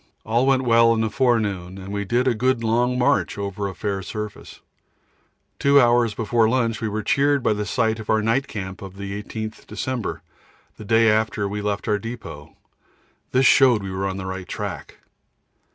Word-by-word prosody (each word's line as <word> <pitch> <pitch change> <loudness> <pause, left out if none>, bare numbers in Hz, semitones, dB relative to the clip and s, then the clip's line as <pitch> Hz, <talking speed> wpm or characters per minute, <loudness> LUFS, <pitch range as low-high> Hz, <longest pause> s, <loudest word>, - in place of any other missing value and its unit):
All 120 +4 +1
went 135 -1 +3
well 115 -1 +4
in 110 - 0
the 110 -1 -1
forenoon, 105 -9 0
and 95 0 -9
we 100 0 -2
did 120 +5 +1
a 125 - +3
good 125 +1 0
long 120 +3 +1
march 125 -3 +1
over 100 0 -3
a 95 - -7
fair 100 -2 -3
surface. 105 +2 -7 1.0
Two 140 0 +5
hours 120 -3 +3
before 115 0 +2
lunch 115 -3 0
we 110 - -1
were 105 +1 -3
cheered 140 +3 +2
by - - +3
the 105 0 -3
sight 110 -1 0
of 110 - -9
our 110 -1 +2
night 120 +5 +1
camp 95 -3 -6
of 95 -1 -9
the 100 +1 -5
18th 110 +1 -7
December, 130 -4 -4 0.5
the 110 - -10
day 115 +2 +4
after 110 -1 +1
we 105 +1 -4
made 105 - -1 0.2
our 105 -1 +1
depôt 115 -10 -9 0.8
this 130 +1 +3
showed 125 -6 +5
we 95 - -5
were 95 +1 -2
on 95 0 -4
the 95 - -6
right 95 -1 -5
track. - - -6
110 Hz, 190 wpm, -22 LUFS, 100-120 Hz, 1.0 s, Two